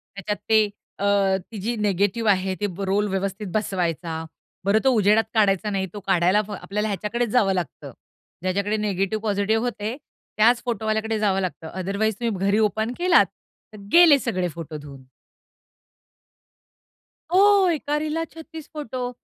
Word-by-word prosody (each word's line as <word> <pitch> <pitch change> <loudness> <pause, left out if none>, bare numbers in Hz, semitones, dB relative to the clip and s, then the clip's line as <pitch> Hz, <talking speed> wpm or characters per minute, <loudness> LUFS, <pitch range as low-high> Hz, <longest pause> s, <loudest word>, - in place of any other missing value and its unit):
त्याच्यात 200 +1 -3
ते 215 -1 +4 0.3
अ, 200 - -1 0.5
ती 220 - -7
जी 235 +4 -1
निगेटिव्ह 205 +2 +1
आहे 190 0 0
ती 210 - -1 0.2
रोल 200 +2 +1
व्यवस्थित 195 +1 -3
बसवायचा. 170 -5 -2 0.4
बरं 205 +2 +4
तो 265 - +4
उजेडात 215 -1 +4
काढायचा 210 -1 +2
नाही. 195 -1 -1
तो 205 - -6
काढायला 180 +2 +3 0.2
आपल्याला 210 +2 -2
ह्याच्याकडेच 215 +4 -2
जावं 205 -4 +3
लागतं. 180 -5 -5 0.5
ज्याच्याकडे 200 +3 0
निगेटिव्ह, 205 0 -1
पॉझिटिव्ह 210 +1 +1
होते 225 -1 -3 0.4
त्याच 235 +3 +4
फोटोवाल्याकडे 220 -1 -1
जावं 195 -3 +1
लागतं, 180 -3 -4
अदरवाईज 200 +3 -1
तुम्ही 210 -5 -1
घरी 200 +1 +3
ओपन 220 +2 0
केलात, 360 0 +5 0.5
तर - - -10
गेले 335 -5 +7
सगळे 185 -8 -1
फोटो 160 -2 -7
धुऊन. 140 -3 -11 2.3
हो, 395 0 +5
एका 295 -1 -2
रीलला 310 +2 -2
36 320 -1 -11
फोटो. 255 -5 -4
210 Hz, 140 wpm, -23 LUFS, 195-235 Hz, 2.3 s, गेले